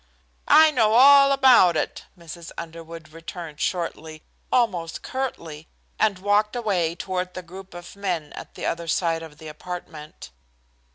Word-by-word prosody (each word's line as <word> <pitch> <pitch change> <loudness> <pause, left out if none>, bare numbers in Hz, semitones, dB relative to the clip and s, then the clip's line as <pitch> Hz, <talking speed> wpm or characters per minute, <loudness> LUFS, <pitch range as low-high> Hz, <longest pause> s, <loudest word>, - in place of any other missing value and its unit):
"I 315 0 +7
know 220 -6 +2
all 275 +2 +7
about 255 -11 +5
it," - - -4
Mrs. 170 0 -10
Underwood 165 -1 -9
returned 165 -1 -9
shortly, 160 -3 -4 0.3
almost 185 -10 0
curtly, 165 - -5 0.3
and 210 -3 +2
walked 205 +3 +1
away 185 -8 -1
toward 180 0 -4
the 185 - -6
group 185 +1 -12
of 175 +2 -11
men 180 -7 -4
at - - -11
the - - -6
other 170 0 -3
side 165 0 0
of 160 -2 -11
the 160 - -11
apartment. 155 - -9
175 Hz, 145 wpm, -23 LUFS, 165-205 Hz, 0.3 s, I